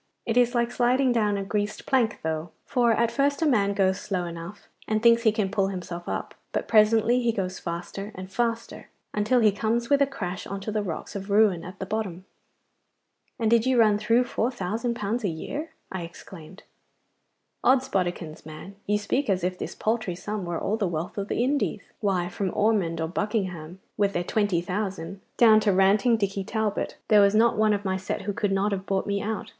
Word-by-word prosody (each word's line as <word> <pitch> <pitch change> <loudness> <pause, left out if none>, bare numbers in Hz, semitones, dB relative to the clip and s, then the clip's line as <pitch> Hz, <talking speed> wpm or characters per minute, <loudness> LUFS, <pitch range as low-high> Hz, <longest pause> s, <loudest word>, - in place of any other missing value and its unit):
It 225 - -1
is 245 0 +3
like 235 0 +1
sliding 250 +1 +2
down 210 -4 +1
a 195 - -2
greased 205 +1 -3
plank 245 -5 +1
though, 160 +1 -2 0.2
for 240 -3 +2
at 230 +1 +2
first 280 +5 +1
a - - +3
man 200 -8 +2
goes 190 -1 +2
slow 185 -3 -2
enough, 170 +4 -8 0.2
and 215 0 +1
thinks 230 +1 +5
he 225 -2 +4
can 210 -3 -1
pull 195 -2 +1
himself 175 -2 -6
up, - - -4 0.2
but - - -2
presently 225 +3 +4
he 235 -1 +2
goes 190 -4 -3
faster 175 +4 -5
and 185 +1 -8
faster, 230 +1 -2 0.2
until 215 +4 +2
he 215 -2 +5
comes 230 +4 -1
with 285 0 +5
a 280 - +5
crash 190 -10 -5
on 200 - -4
to 215 - -4
the 215 0 0
rocks 180 -2 -5
of 195 0 -5
ruin 200 -4 +3
at 185 +3 -9
the 190 - -4
bottom.' 190 -3 -4 1.1
'And 225 -1 +1
did 235 +1 +4
you 260 -1 +3
run 210 -2 +4
through 230 +4 +3
four 245 -1 -1
thousand 230 +2 -2
pounds 225 +2 -2
a - - +1
year?' 285 - -5 0.2
I 190 - -4
exclaimed. 170 +1 -11 1.0
'Od's 265 0 +4
bodikins, 175 -7 -2
man, 155 +6 -10
you 210 +1 +2
speak 255 +5 -1
as 185 -2 +1
if 180 +1 0
this - - -5
paltry 220 -5 -1
sum 205 +2 -4
were 175 -1 -2
all 215 - -1
the 205 -4 0
wealth 170 +3 -4
of 200 - -3
the 235 - 0
Indies. 270 -5 0 0.2
Why, 190 -4 0
from 190 +2 -2
Ormonde 195 -7 +1
or 160 - 0
Buckingham, 185 -3 -3 0.2
with 200 -1 +2
their 175 - 0
twenty 205 -3 +1
thousand, 190 0 -4 0.2
down 220 -2 +7
to 210 -1 +2
ranting 200 +5 +4
Dicky 200 -2 -1
Talbot, 215 0 -2
there 210 -1 +7
was 200 +1 +4
not 230 +2 +4
one 215 0 +3
of 205 0 -3
my 190 0 0
set 190 +1 -4
who 205 +1 -2
could 205 0 -1
not 195 +2 +1
have 195 -1 -3
bought 195 -1 0
me 200 -1 -1
out. 220 0 -4
205 Hz, 210 wpm, -26 LUFS, 190-230 Hz, 1.1 s, down